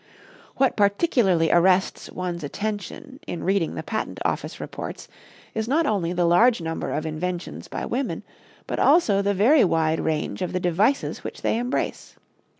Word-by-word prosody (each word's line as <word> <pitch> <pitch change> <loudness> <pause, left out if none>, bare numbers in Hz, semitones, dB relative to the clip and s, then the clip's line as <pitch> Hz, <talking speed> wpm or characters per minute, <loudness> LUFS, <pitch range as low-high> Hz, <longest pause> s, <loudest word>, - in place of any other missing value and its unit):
What 270 -1 +2
particularly 200 - +2
arrests 185 +2 +3
one's 175 -2 -4
attention 215 - -5
in 175 - -4
reading 190 -3 0
the - - -4
Patent - - -4
Office - - -2
reports - - -7 0.5
is 220 0 -2
not 315 +6 +2
only 195 -9 0
the 175 -1 +1
large 220 +8 +5
number 165 -1 -3
of 155 - -2
inventions 170 +3 -4
by - - -4
women, 260 +2 -2 0.4
but - - -3
also 205 - +4
the 200 0 0
very 250 +10 +5
wide 160 -3 +1
range 155 +3 -2
of 180 - -2
the 180 - 0
devices 195 +10 +1
which - - -7
they - - +1
embrace. 245 +2 -3
190 Hz, 155 wpm, -24 LUFS, 170-230 Hz, 0.5 s, large